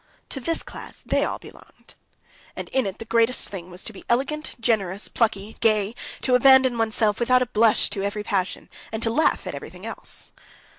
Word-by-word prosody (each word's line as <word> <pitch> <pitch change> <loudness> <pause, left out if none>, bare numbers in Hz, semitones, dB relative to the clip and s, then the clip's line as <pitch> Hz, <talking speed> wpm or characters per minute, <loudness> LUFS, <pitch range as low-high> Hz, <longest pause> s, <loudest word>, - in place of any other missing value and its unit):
To 270 - -3
this 330 +6 -1
class - - -8
they - - +1
all - - -2
belonged, - - -16 0.6
and - - -6
in 265 -5 +1
it 190 - -5
the 225 - -8
great 230 +1 +3
thing 190 -8 -1
was 180 +1 -5
to 225 - -7
be 195 - -12
elegant, 275 +6 0
generous, 205 -4 0
plucky, 215 -2 -1
gay, 215 -1 +2 0.3
to 255 - +2
abandon 260 0 +6
oneself 220 -2 +1
without 250 +1 +4
a 245 - -9
blush 220 0 +4
to 195 - -2
every 200 +1 -2
passion, 195 -3 -2 0.2
and 220 +1 -3
to 225 - +2
laugh 310 +7 +2
at - - -4
everything - - -9
else. - - -8
225 Hz, 190 wpm, -24 LUFS, 205-250 Hz, 0.6 s, abandon